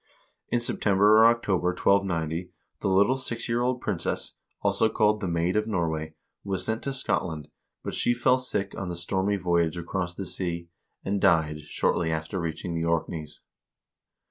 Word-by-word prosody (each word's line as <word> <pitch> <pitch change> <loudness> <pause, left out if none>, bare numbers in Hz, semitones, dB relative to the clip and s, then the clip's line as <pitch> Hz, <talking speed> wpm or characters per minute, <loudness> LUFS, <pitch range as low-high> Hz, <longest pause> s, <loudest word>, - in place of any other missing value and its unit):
In 120 - +1
September 105 -2 +4
or 110 +1 +8
October, 105 -6 +1
1290, 90 -2 +1 0.3
the - - -2
little 100 +7 +4
six 115 -3 -2
year 120 0 0
old 125 0 0
princess, 95 -6 -2 0.3
also 110 - +2
called 105 -1 +2
the 95 - -2
Maid 85 +2 0
of 105 0 +1
Norway, 80 -6 -2 0.3
was 95 -2 -2
sent 110 0 -1
to 140 - -1
Scotland, 80 - -2 0.3
but - - -4
she 120 - +2
fell 125 +2 +3
sick 100 -6 -2
on 95 - -4
the 85 - -4
stormy 95 +4 0
voyage 85 -2 +1
across 90 +1 -3
the 95 - -5
sea, 85 -2 -3 0.4
and 100 0 -1
died 80 -6 +3
shortly 80 +2 0
after 80 +4 -3
reaching 85 +1 -4
the 85 0 -1
Orkneys. 85 -1 -2
95 Hz, 165 wpm, -27 LUFS, 85-105 Hz, 0.4 s, or